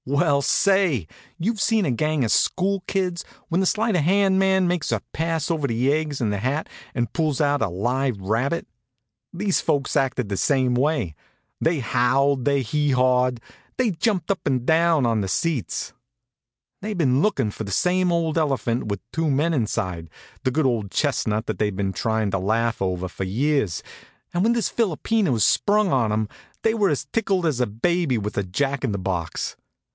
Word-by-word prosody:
Well, 140 +1 +2
say! 190 - +2 0.3
You've 205 +4 -1
seen 220 -2 +2
a 140 - +1
gang 155 +3 0
of 110 - -1
school 195 +1 +1
kids 180 -3 -1 0.3
when 170 +1 +1
the 190 - +2
sleight 220 +1 +1
of 175 - +3
hand 190 +3 +3
man 190 -1 +3
makes 175 -2 -1
a - - 0
pass 165 -1 -1
over 155 -4 0
the 125 +4 +1
egg 150 -2 -2
in 110 -4 0
the 100 - -2
hat 130 +8 -1 0.3
and 120 -1 -1
pulls 155 -5 0
out 145 -1 +2
a 110 - +1
live 120 +5 -1
rabbit? 115 - -1 0.6
These 190 +1 0
folks 145 -4 0
acted 130 -3 +1
the 100 -1 -3
same 130 0 +2
way. 130 - 0 0.5
They 160 -3 +1
howled, 130 +3 +2
they 140 -2 +2
hee 145 +5 0
hawed, 125 -1 +2 0.4
they 245 -4 +2
jumped 185 0 0
up 195 - -1
and 130 -3 0
down 160 -3 +3
on 115 -2 +1
the 95 - -2
seats. 150 - -2 0.9
They'd 210 0 -4
been 135 -5 +2
lookin' 135 - +1
for 110 - -6
the 100 - -6
same 180 - +2
old 165 -1 +1
elephant 130 -7 -1
with 100 -2 -3
two 165 -1 0
men 150 +5 +1
inside, 90 - -2 0.3
the - - +2
good 150 +3 0
old 115 -6 0
chestnut 110 -5 0
that - - -4
they'd 105 -2 0
been 95 0 -2
tryin' 110 +1 -1
to 95 - 0
laugh 115 +4 0
over 95 -1 -1
for 90 - -5
years, 110 - 0 0.5
and 175 - 0
when 230 +2 +3
this 235 -2 0
philopena 215 - 0
was 115 -4 +3
sprung 205 -2 +2
on 120 -5 +2
'em 110 0 0 0.4
they 225 - +3
were 210 -4 +2
as 145 -3 -1
tickled 195 -5 +1
as 150 -6 0
a 125 - +2
baby 140 - 0
with 105 0 -4
a 100 - 0
jack 135 +10 -2
in 120 -6 0
the - - -1
box. 90 -4 -3
140 Hz, 190 wpm, -23 LUFS, 115-170 Hz, 0.9 s, of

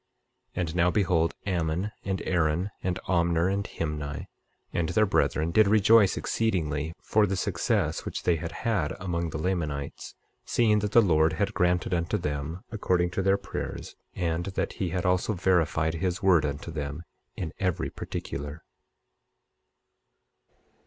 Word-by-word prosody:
25:17 - - -3
And 85 -1 -2
now 90 0 +4
behold, 90 -4 +2
Ammon, 90 +1 -1
and 95 -1 -2
Aaron, 85 +2 +1
and 90 -1 -1
Omner, 85 0 +2
and 100 0 -1
Himni, 75 -5 -4 0.5
and 85 -2 0
their 110 -1 +3
brethren 80 -4 +1
did 110 +4 +5
rejoice 105 -1 +5
exceedingly, 80 -8 -1
for 105 -1 +3
the 95 - -1
success 95 -3 0
which - - -5
they 85 -2 +3
had 85 +1 -5
had 100 -10 -1
among 85 -3 -2
the - - -4
Lamanites, 75 -4 -3 0.3
seeing 110 -3 +3
that 105 0 -2
the 115 - +7
Lord 80 -3 +3
had 100 +6 -1
granted 90 +1 +1
unto 85 +4 0
them 75 +1 -4
according 90 -5 +1
to 95 - -1
their 95 +1 +3
prayers, 100 - -6 0.2
and 85 -1 -1
that - - 0
he 95 - -2
had 90 +1 -2
also 90 +4 +2
verified 85 -4 +2
his 90 +5 -2
word 85 -6 +5
unto 70 +4 -5
them 75 0 -4 0.3
in 80 -3 -4
every 90 -3 -1
particular. 75 +2 -6
90 Hz, 150 wpm, -27 LUFS, 80-95 Hz, 0.5 s, the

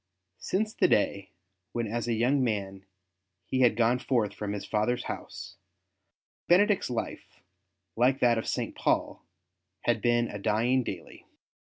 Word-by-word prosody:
Since 215 +3 -1
the - - +3
day 100 -1 +1 0.4
when 120 -1 -1
as 115 +2 -3
a 115 - +1
young 130 +4 +2
man 100 -4 -3 0.6
he 130 - -2
had 120 -4 +4
gone 120 +2 +2
forth 120 -5 0
from 105 -1 -4
his 100 - -5
father's 115 +3 0
house, - - -7 0.9
Benedict's 200 - +4
life, 120 - -5 0.6
like 130 +3 +3
that 120 -2 +3
of - - -6
St. - - -2
Paul, - - 0 0.6
had 120 - 0
been 120 -1 +2
a 105 - -7
dying 120 +6 +2
daily. 90 -7 -8
120 Hz, 145 wpm, -28 LUFS, 105-125 Hz, 0.9 s, had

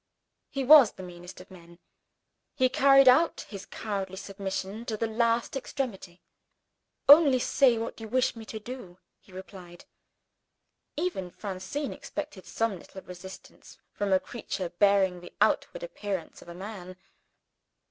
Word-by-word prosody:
He 275 - -3
was 275 -3 +8
the 185 - -10
meanest 175 0 -11
of 185 - -17
men 170 -2 -15 0.8
he 255 -1 +3
carried 275 +1 +5
out 290 +7 +5
his 200 -2 -10
cowardly 195 -3 -4
submission 195 +2 -5
to 220 -2 -3
the 225 - -1
last 230 +2 0
extremity. 230 -10 -5 0.8
"Only 285 -2 +8
say 250 -1 +3
what 225 0 -5
you 220 - -6
wish 255 +3 +1
me 225 - -9
to 220 - -7
do," 215 -6 -9 0.2
he - - -22
replied. 185 -2 -11 1.1
Even 300 - -2
Francine 200 +10 -5
expected 295 -11 -7
some 225 -5 -1
little 190 - -12
resistance 185 +1 -12
from 205 -1 -3
a 190 - +5
creature 190 -6 -5
bearing 190 -1 +2
the 175 - -12
outward - - +1
appearance 205 - -5
of - - -14
a 170 - -9
man. 185 -1 -8
205 Hz, 140 wpm, -28 LUFS, 185-255 Hz, 1.1 s, was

